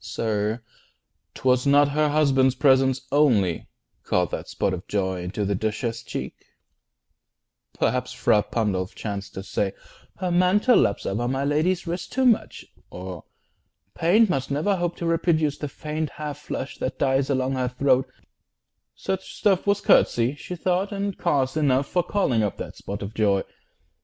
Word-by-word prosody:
Sir, 110 Hz, +1 st, -2 dB, 0.7 s
'twas 125 Hz, +1 st, +2 dB
not 145 Hz, +1 st, +5 dB
Her 150 Hz, +1 st, +1 dB
husband's 135 Hz, -3 st, +3 dB
presence 130 Hz, -1 st, +3 dB
only, 120 Hz, -, +2 dB, 0.3 s
called -, -, 0 dB
that -, -, -5 dB
spot 95 Hz, -, -1 dB
Of 90 Hz, 0 st, -6 dB
joy 95 Hz, -3 st, -1 dB
into 90 Hz, +4 st, -3 dB
the 100 Hz, -, 0 dB
Duchess' 110 Hz, +3 st, -2 dB
cheek: -, -, -5 dB, 1.4 s
perhaps -, -, 0 dB
Fra 105 Hz, -, +3 dB
Pandolf 100 Hz, -5 st, -2 dB
chanced 100 Hz, -2 st, -6 dB
to 95 Hz, -, -5 dB
say 95 Hz, 0 st, -2 dB, 0.4 s
"Her 185 Hz, -1 st, -2 dB
mantle 185 Hz, +7 st, +4 dB
laps 100 Hz, -, +1 dB
Over 120 Hz, +5 st, -1 dB
my 135 Hz, +2 st, -1 dB
lady's 165 Hz, +6 st, +1 dB
wrist 175 Hz, +1 st, -4 dB
too 265 Hz, 0 st, +1 dB
much," 235 Hz, -4 st, +1 dB, 0.2 s
or 90 Hz, -2 st, -8 dB, 0.7 s
"Paint 205 Hz, +7 st, +4 dB
Must 135 Hz, -7 st, -1 dB
never 155 Hz, +8 st, +1 dB
hope 175 Hz, -1 st, -2 dB
to 170 Hz, -, -5 dB
reproduce 165 Hz, -3 st, +1 dB
the 150 Hz, -, -3 dB
faint 155 Hz, +1 st, -4 dB
Half 150 Hz, -1 st, -6 dB
flush 140 Hz, -2 st, -6 dB
that 130 Hz, -, -3 dB
dies 135 Hz, 0 st, +1 dB
along 130 Hz, -1 st, 0 dB
her 130 Hz, -1 st, -1 dB
throat"; 130 Hz, +1 st, +1 dB, 0.9 s
such 190 Hz, 0 st, -4 dB
stuff 200 Hz, -2 st, +2 dB
Was 200 Hz, 0 st, +2 dB
courtesy, 120 Hz, -7 st, +3 dB
she 165 Hz, +5 st, -7 dB
thought, 185 Hz, +3 st, 0 dB
and 200 Hz, -1 st, -2 dB
cause 135 Hz, -5 st, 0 dB
enough 140 Hz, -3 st, +1 dB
20 -, -, -23 dB
For 180 Hz, -1 st, 0 dB
calling 130 Hz, -, +2 dB
up 105 Hz, -2 st, -1 dB
that -, -, -7 dB
spot 100 Hz, +1 st, -6 dB
of 100 Hz, +2 st, -6 dB
joy. 100 Hz, -3 st, +2 dB
135 Hz, 160 wpm, -24 LUFS, 110-170 Hz, 1.4 s, not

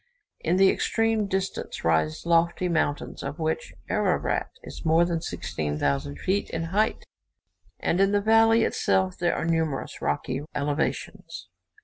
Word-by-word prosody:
In 170 Hz, -, 0 dB
the 195 Hz, 0 st, +6 dB
extreme 225 Hz, -2 st, +1 dB
distance 190 Hz, 0 st, -3 dB
rise 80 Hz, -, +1 dB
lofty 170 Hz, +1 st, +2 dB
mountains, 155 Hz, -4 st, -1 dB
of 140 Hz, +2 st, -5 dB
which 160 Hz, -1 st, -2 dB, 0.2 s
Ararat -, -, 0 dB
is -, -, -9 dB
more 165 Hz, +2 st, +4 dB
than 170 Hz, -2 st, -1 dB
16,000 70 Hz, -, -2 dB
feet 195 Hz, -, -1 dB
in 165 Hz, -, -3 dB
height, 215 Hz, +2 st, +1 dB, 0.7 s
and 175 Hz, -, +1 dB
in 195 Hz, 0 st, +4 dB
the 205 Hz, -, +3 dB
valley 225 Hz, +2 st, +5 dB
itself 190 Hz, -4 st, +1 dB
there 175 Hz, -1 st, +1 dB
are -, -, -2 dB
numerous 160 Hz, -4 st, -1 dB
rocky 125 Hz, -, -1 dB
elevations. 150 Hz, -, -3 dB
170 Hz, 135 wpm, -26 LUFS, 145-195 Hz, 0.7 s, the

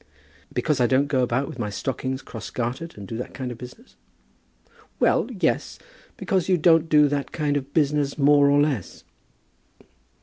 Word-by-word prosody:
"Because 145 Hz, -4 st, 0 dB
I 120 Hz, -, +4 dB
don't 135 Hz, +3 st, +3 dB
go 140 Hz, -3 st, 0 dB
about 125 Hz, +2 st, 0 dB
with 155 Hz, -6 st, -9 dB
my 105 Hz, -3 st, -2 dB
stockings 130 Hz, +4 st, -4 dB
cross 115 Hz, -3 st, -8 dB
gartered, 125 Hz, +7 st, -4 dB
and 100 Hz, -1 st, -9 dB
do 115 Hz, -, -5 dB
that 125 Hz, -, -7 dB
kind 130 Hz, -2 st, -4 dB
of 120 Hz, -, -9 dB
business?" 125 Hz, -, -12 dB, 1.0 s
"Well, -, -, +2 dB
yes; -, -, -1 dB, 0.4 s
because 190 Hz, -4 st, -1 dB
you 185 Hz, -, +4 dB
don't 165 Hz, 0 st, +4 dB
do 150 Hz, -2 st, +5 dB
that 140 Hz, -1 st, -2 dB
kind 150 Hz, -2 st, -1 dB
of 140 Hz, -1 st, -3 dB
business, 145 Hz, -2 st, +1 dB
more 145 Hz, 0 st, +5 dB
or 145 Hz, 0 st, +4 dB
less." 145 Hz, -, -1 dB
140 Hz, 170 wpm, -24 LUFS, 125-150 Hz, 1.0 s, do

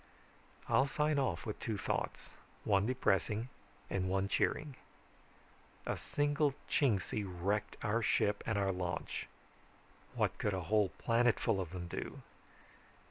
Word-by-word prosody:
"I'll 135 Hz, -, +4 dB
sign 150 Hz, +1 st, +1 dB
off 135 Hz, -, 0 dB
with 105 Hz, -, -4 dB
two 110 Hz, -3 st, -2 dB
thoughts, -, -, -2 dB, 0.3 s
one 100 Hz, 0 st, +3 dB
depressing 115 Hz, -2 st, +1 dB, 0.4 s
and 95 Hz, -1 st, -1 dB
one 95 Hz, +1 st, +1 dB
cheering. 145 Hz, +7 st, 0 dB, 1.1 s
A -, -, 0 dB
single 145 Hz, -1 st, +1 dB
Chingsi 105 Hz, -6 st, +1 dB
wrecked 100 Hz, +3 st, -1 dB
our 110 Hz, +3 st, +1 dB
ship 105 Hz, -1 st, +2 dB
and 110 Hz, -, +1 dB
our 100 Hz, -1 st, +2 dB
launch. 90 Hz, -1 st, -3 dB, 0.9 s
What -, -, +1 dB
could 105 Hz, -2 st, +1 dB
a 95 Hz, -, -2 dB
whole 105 Hz, +2 st, +3 dB, 0.2 s
planetful 115 Hz, -4 st, +3 dB
of 90 Hz, -, -4 dB
them 90 Hz, 0 st, -5 dB
do? -, -, -5 dB
105 Hz, 130 wpm, -35 LUFS, 95-125 Hz, 1.1 s, I'll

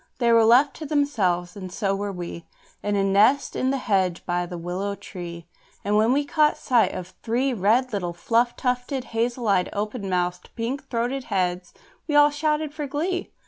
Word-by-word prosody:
They 235 Hz, -2 st, +2 dB
were 230 Hz, -1 st, +6 dB
left 250 Hz, +5 st, +5 dB
to 315 Hz, -, -6 dB
themselves 200 Hz, -, 0 dB
(and 185 Hz, -3 st, -7 dB
so 195 Hz, +1 st, -1 dB
were 200 Hz, +1 st, -3 dB
we) 175 Hz, -2 st, -7 dB, 0.3 s
In 205 Hz, 0 st, -1 dB
a 200 Hz, -, +2 dB
nest 210 Hz, +8 st, +3 dB
in 260 Hz, -, 0 dB
the 275 Hz, -, +1 dB
hedge 190 Hz, -8 st, 0 dB
by 175 Hz, 0 st, -1 dB
the 175 Hz, -, -6 dB
willow 185 Hz, +4 st, -3 dB
tree; 170 Hz, -4 st, -8 dB, 0.4 s
And 205 Hz, +1 st, +1 dB
when 220 Hz, +3 st, +4 dB
we 285 Hz, +2 st, +2 dB
caught 300 Hz, +1 st, +2 dB
sight 245 Hz, -3 st, +2 dB
of 180 Hz, 0 st, -7 dB
three 250 Hz, +4 st, 0 dB
red 230 Hz, +4 st, +2 dB
little 180 Hz, -4 st, -2 dB
fluff 230 Hz, +8 st, +1 dB
tufted, 250 Hz, +1 st, -2 dB
hazel 235 Hz, +1 st, -1 dB
eyed, 190 Hz, -3 st, +2 dB
open 210 Hz, 0 st, -3 dB
mouthed, 180 Hz, 0 st, -1 dB
pink 240 Hz, +4 st, -4 dB
throated 245 Hz, +2 st, -2 dB
heads, 180 Hz, -3 st, -1 dB, 0.4 s
we 295 Hz, -, -1 dB
all 295 Hz, 0 st, +7 dB
shouted 300 Hz, 0 st, -1 dB
for 300 Hz, -2 st, -4 dB
glee. 340 Hz, +6 st, -2 dB
225 Hz, 185 wpm, -24 LUFS, 185-265 Hz, 0.4 s, all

